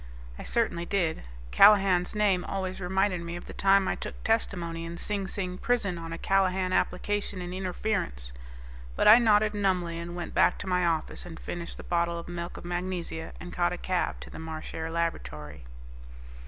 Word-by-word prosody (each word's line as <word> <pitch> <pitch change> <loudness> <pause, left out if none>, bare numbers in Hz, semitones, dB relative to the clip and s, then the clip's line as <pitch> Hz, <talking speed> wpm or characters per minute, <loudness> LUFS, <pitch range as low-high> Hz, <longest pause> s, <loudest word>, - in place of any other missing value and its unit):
I - - -5
certainly 215 -7 0
did. 175 -5 0 0.3
Callahan's 195 -3 +6
name 200 -4 +2
always 190 -1 -3
reminded 190 0 +1
me 170 0 -5
of 175 - -7
the - - -9
time 195 0 +4
I - - +1
took - - -7
testimony 175 -7 0
in 170 +1 -6
Sing 200 +1 -2
Sing 185 -2 -3
Prison 205 -8 0
on 165 0 -7
a 165 - -4
Callahan 190 0 +1
application 205 +2 0
in 180 0 -5
Interference. 185 - -2 0.6
But - - +2
I 220 +3 +10
nodded 215 -2 +4
numbly 180 -5 0
and 170 +1 -6
went 175 - -5
back - - +4
to 205 - -7
my 180 -1 +2
office 160 -2 -1
and 175 -2 -9
finished 170 -1 -6
the - - -9
bottle 170 0 0
of 170 - -7
milk 175 0 -5
of - - -9
magnesia 175 -2 -4
and 175 0 -8
caught 175 0 +1
a - - -4
cab 185 0 -1
to - - -9
the - - -8
Marchare 160 0 -5
Laboratory. 75 - -4
180 Hz, 180 wpm, -28 LUFS, 170-195 Hz, 0.6 s, I